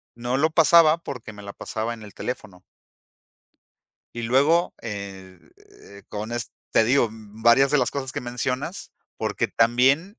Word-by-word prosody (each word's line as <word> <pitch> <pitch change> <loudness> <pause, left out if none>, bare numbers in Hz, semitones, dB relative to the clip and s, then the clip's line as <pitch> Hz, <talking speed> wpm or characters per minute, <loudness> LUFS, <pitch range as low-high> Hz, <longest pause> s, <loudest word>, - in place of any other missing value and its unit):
no 120 +2 -2
lo 155 +3 +3
pasaba 160 0 +6
porque 125 -9 -8
me 105 - -11
la 100 - -8
pasaba 110 +2 -4
en 110 - -13
el 105 - -12
teléfono. 100 -7 -6 1.5
Y 120 - -5
luego, 145 +9 +3
eh, 95 -4 -7 0.7
con 105 +2 -5
es 120 -2 -4 0.2
te 110 - +4
digo, 125 0 +3
varias 115 +5 +2
de 145 - +3
las - - +1
cosas 135 -2 -4
que - - -3
mencionas, 125 +8 -4 0.3
porque - - -1
también 135 - +2
120 Hz, 145 wpm, -24 LUFS, 110-140 Hz, 1.5 s, pasaba